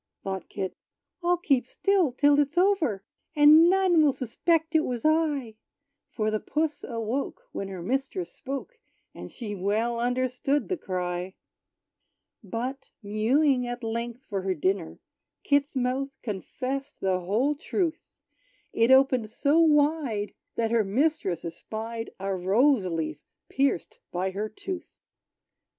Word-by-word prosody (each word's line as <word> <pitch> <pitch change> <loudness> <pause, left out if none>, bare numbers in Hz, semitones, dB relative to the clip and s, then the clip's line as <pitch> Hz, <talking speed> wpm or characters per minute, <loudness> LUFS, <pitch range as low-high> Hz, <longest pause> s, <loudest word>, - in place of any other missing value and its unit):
Thought 190 -1 -4
Kit, 190 -2 -4 0.5
"I'll 350 0 +2
keep 275 -8 +1
still 380 -2 +2
till 285 +3 +4
it's 290 +3 0
over; 340 - +2 0.3
And 305 +3 +8
none 370 -3 +4
will 295 -3 +4
suspect 320 +7 0
it 320 - +6
was 245 -3 -3
I." 295 -8 +1 0.5
For 215 -1 -1
the 215 - 0
puss 305 +5 -2
awoke, 240 - -3
when 195 - -4
her 185 -3 -7
mistress 270 - -2
spoke; 280 - -6 0.3
And - - -9
she 220 -4 -6
well 215 +5 0
understood 255 +3 0
the 370 - 0
cry. 180 - -3 1.1
But, 250 +7 -5
mewing 250 +6 +2
at 245 0 -5
length 235 +2 -4
for 195 -2 -3
her 190 0 -1
dinner, 185 +1 -1 0.5
Kit's 285 0 +1
mouth 260 +2 0
confessed 255 +6 -4
the 190 -1 +1
whole 215 +11 +1
truth: 330 +2 -2 0.7
It 230 +1 +3
opened 260 -4 +5
so 285 +7 +2
wide 295 -9 +2 0.2
that 225 -1 0
her 230 -2 +3
mistress 200 - 0
espied 225 +7 -5
A 195 0 -2
rose 200 +5 +3
leaf 155 -3 -3 0.3
pierced 270 -9 0
by 185 +2 -1
her 210 +3 -3
tooth! 380 - -6
250 Hz, 135 wpm, -27 LUFS, 205-295 Hz, 1.1 s, And